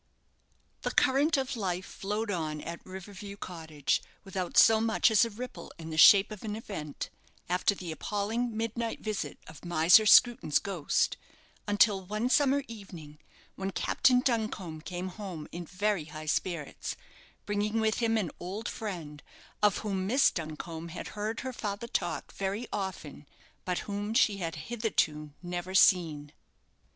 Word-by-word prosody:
The -, -, -1 dB
current 280 Hz, +4 st, +3 dB
of 265 Hz, 0 st, -1 dB
life 185 Hz, -4 st, -2 dB
flowed 210 Hz, +2 st, -3 dB
on 155 Hz, -4 st, -2 dB
at 170 Hz, 0 st, -7 dB
River 190 Hz, +2 st, -9 dB
View 200 Hz, +1 st, -8 dB
Cottage 160 Hz, -7 st, -2 dB, 0.2 s
without 190 Hz, -3 st, -4 dB
so 220 Hz, -1 st, +7 dB
much 225 Hz, +1 st, +3 dB
as 220 Hz, -, +6 dB
a -, -, -4 dB
ripple 245 Hz, +4 st, -8 dB
in 160 Hz, -1 st, -8 dB
the -, -, -4 dB
shape 200 Hz, +5 st, +8 dB
of 210 Hz, -, -8 dB
an 210 Hz, -1 st, -3 dB
event, 190 Hz, -10 st, -6 dB, 0.4 s
after 180 Hz, +3 st, +2 dB
the 180 Hz, -3 st, -6 dB
appalling 215 Hz, +7 st, -2 dB
midnight 230 Hz, +1 st, -2 dB
visit 215 Hz, -2 st, -3 dB
of 160 Hz, -2 st, -13 dB
Miser 175 Hz, +4 st, +6 dB
Screwton's 235 Hz, -11 st, +6 dB
ghost, 185 Hz, -7 st, 0 dB, 0.5 s
until 205 Hz, -1 st, +4 dB
one 215 Hz, +6 st, -2 dB
summer 280 Hz, 0 st, +3 dB
evening, 175 Hz, -9 st, -10 dB, 0.4 s
when 195 Hz, 0 st, -3 dB
Captain 250 Hz, +5 st, +3 dB
Duncombe 215 Hz, -, -2 dB
came 180 Hz, +2 st, -5 dB
home 180 Hz, -6 st, -7 dB
in 175 Hz, 0 st, -6 dB
very 200 Hz, -2 st, 0 dB
high 155 Hz, 0 st, -8 dB
spirits, 160 Hz, -1 st, -2 dB, 0.5 s
bringing 210 Hz, +2 st, 0 dB
with 220 Hz, 0 st, +1 dB
him 225 Hz, -1 st, +2 dB
an 195 Hz, -6 st, -1 dB
old 195 Hz, +5 st, -5 dB
friend, 170 Hz, -10 st, -6 dB, 0.4 s
of 210 Hz, -1 st, +4 dB
whom 190 Hz, -2 st, -1 dB
Miss 260 Hz, +6 st, +4 dB
Duncombe 160 Hz, 0 st, -6 dB
had 170 Hz, -, -7 dB
heard 215 Hz, +2 st, -3 dB
her 260 Hz, 0 st, -4 dB
father 210 Hz, -1 st, -4 dB
talk -, -, -2 dB
very 200 Hz, +5 st, -3 dB
often; 160 Hz, -7 st, -5 dB, 0.4 s
but 180 Hz, -1 st, -1 dB
whom 205 Hz, +2 st, -3 dB
she 205 Hz, -3 st, +4 dB
had 165 Hz, -4 st, -3 dB
hitherto 155 Hz, -7 st, -1 dB
never 175 Hz, +1 st, -4 dB
seen. 155 Hz, -7 st, +4 dB
195 Hz, 150 wpm, -30 LUFS, 170-220 Hz, 0.5 s, shape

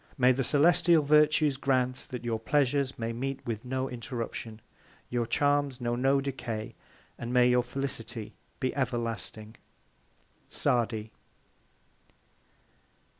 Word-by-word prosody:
May 130 Hz, -1 st, +5 dB
the 130 Hz, +1 st, 0 dB
Celestial 165 Hz, +3 st, +4 dB
Virtues 150 Hz, -1 st, +4 dB
grant, 130 Hz, -2 st, 0 dB
that 125 Hz, -1 st, -6 dB
your 115 Hz, -2 st, -1 dB
Pleasures 140 Hz, +1 st, +1 dB
may 115 Hz, 0 st, -3 dB
meet 135 Hz, +3 st, -3 dB
with 115 Hz, -1 st, -3 dB
no 130 Hz, +1 st, -2 dB
Interruption; 115 Hz, -3 st, -6 dB, 0.5 s
your 120 Hz, -1 st, 0 dB
Charms 145 Hz, -2 st, +1 dB
know 120 Hz, 0 st, -1 dB
no 135 Hz, +3 st, +3 dB
Decay; 120 Hz, -5 st, -4 dB, 0.5 s
and 120 Hz, 0 st, -4 dB
may 125 Hz, -1 st, +5 dB
your 125 Hz, 0 st, +4 dB
Felicity 120 Hz, -3 st, -5 dB, 0.3 s
be 130 Hz, -2 st, -1 dB
everlasting! 115 Hz, -4 st, -3 dB, 0.9 s
_SADI. 110 Hz, -3 st, 0 dB
125 Hz, 115 wpm, -29 LUFS, 115-140 Hz, 0.9 s, May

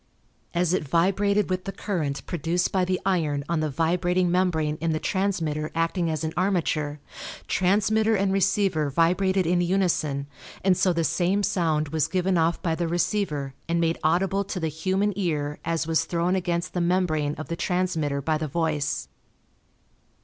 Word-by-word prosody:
As 175 Hz, 0 st, +2 dB
it 185 Hz, -, +1 dB
vibrated 195 Hz, +6 st, +2 dB
with 185 Hz, 0 st, -2 dB
the 195 Hz, -, -3 dB
current 160 Hz, -10 st, -3 dB
produced 175 Hz, +1 st, -1 dB
by 190 Hz, -1 st, +2 dB
the 185 Hz, 0 st, 0 dB
iron 155 Hz, -7 st, +1 dB
on 170 Hz, -2 st, 0 dB
the 155 Hz, 0 st, 0 dB
vibrating 175 Hz, +4 st, +1 dB
membrane 160 Hz, -4 st, +1 dB
in 165 Hz, -1 st, +1 dB
the 155 Hz, -, -1 dB
transmitter 160 Hz, -7 st, -1 dB
acting 165 Hz, +1 st, 0 dB
as 155 Hz, -1 st, -2 dB
an 160 Hz, 0 st, -2 dB
armature, 160 Hz, -6 st, 0 dB, 0.5 s
transmitter 215 Hz, +4 st, +2 dB
and 195 Hz, -1 st, +1 dB
receiver 195 Hz, -5 st, +1 dB
vibrated 180 Hz, +5 st, +2 dB
in 175 Hz, +1 st, +2 dB
unison 170 Hz, -6 st, 0 dB, 0.4 s
and 190 Hz, -1 st, +4 dB
so 185 Hz, -, +2 dB
the 170 Hz, -1 st, 0 dB
same 185 Hz, +5 st, +1 dB
sound 155 Hz, -6 st, +1 dB
was 160 Hz, 0 st, +1 dB
given 185 Hz, 0 st, 0 dB
off 165 Hz, 0 st, +2 dB
by 165 Hz, -3 st, +1 dB
the 170 Hz, +1 st, -1 dB
receiver 165 Hz, -5 st, -1 dB, 0.2 s
and 170 Hz, 0 st, +1 dB
made 165 Hz, 0 st, +1 dB
audible 190 Hz, +5 st, +2 dB
to 195 Hz, -1 st, -5 dB
the 160 Hz, -2 st, -1 dB
human 190 Hz, +6 st, 0 dB
ear 150 Hz, -6 st, -2 dB
as 165 Hz, -1 st, -1 dB
was 160 Hz, 0 st, +1 dB
thrown 175 Hz, +2 st, 0 dB
against 175 Hz, -2 st, -2 dB
the 180 Hz, -, 0 dB
membrane 170 Hz, -4 st, +1 dB
of 155 Hz, -, -7 dB
the 170 Hz, -, -3 dB
transmitter 165 Hz, -6 st, -1 dB
by 155 Hz, +1 st, 0 dB
the 155 Hz, -, -2 dB
voice. 150 Hz, -1 st, -1 dB
170 Hz, 170 wpm, -25 LUFS, 155-185 Hz, 0.5 s, and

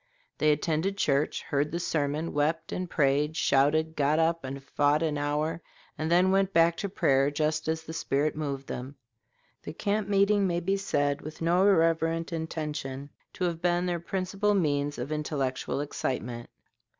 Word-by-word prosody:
"They 155 Hz, -, +4 dB
attended 160 Hz, +6 st, 0 dB
church, 145 Hz, -5 st, +1 dB
heard 145 Hz, +1 st, -1 dB
the 170 Hz, -, -2 dB
sermon, 155 Hz, -1 st, -1 dB
wept 155 Hz, +3 st, 0 dB
and 180 Hz, -1 st, -3 dB
prayed, 150 Hz, +1 st, +1 dB
shouted, 155 Hz, +4 st, +2 dB
got 145 Hz, +2 st, +2 dB
up 165 Hz, 0 st, +1 dB
and 135 Hz, +1 st, -6 dB
fought 145 Hz, +2 st, +1 dB
an 155 Hz, -2 st, 0 dB
hour, 150 Hz, +3 st, -1 dB, 0.3 s
and 155 Hz, +1 st, -3 dB
then 180 Hz, +2 st, +4 dB
went 195 Hz, 0 st, +2 dB
back 165 Hz, 0 st, +4 dB
to 200 Hz, -, -3 dB
prayer, 140 Hz, -7 st, +2 dB
just 155 Hz, +2 st, -1 dB
as 160 Hz, 0 st, -1 dB
the 160 Hz, -, -8 dB
spirit 150 Hz, -1 st, 0 dB
moved 140 Hz, -3 st, -4 dB
them." 130 Hz, +3 st, -6 dB, 0.7 s
The -, -, -7 dB
camp 205 Hz, +3 st, -1 dB
meeting 200 Hz, 0 st, +3 dB
may 175 Hz, -1 st, 0 dB
be 190 Hz, +3 st, 0 dB
said, 145 Hz, -7 st, 0 dB
with 155 Hz, +1 st, -9 dB
no 175 Hz, +4 st, +3 dB
irreverent 165 Hz, -2 st, +2 dB
intention, 150 Hz, -4 st, -4 dB, 0.2 s
to -, -, -4 dB
have 170 Hz, -2 st, -1 dB
been 175 Hz, 0 st, +1 dB
their 175 Hz, -1 st, -1 dB
principal 195 Hz, +4 st, -1 dB
means 145 Hz, -5 st, 0 dB
of 125 Hz, +5 st, -5 dB
intellectual 140 Hz, -3 st, -2 dB
excitement. 125 Hz, -4 st, -4 dB
155 Hz, 165 wpm, -28 LUFS, 145-175 Hz, 0.7 s, They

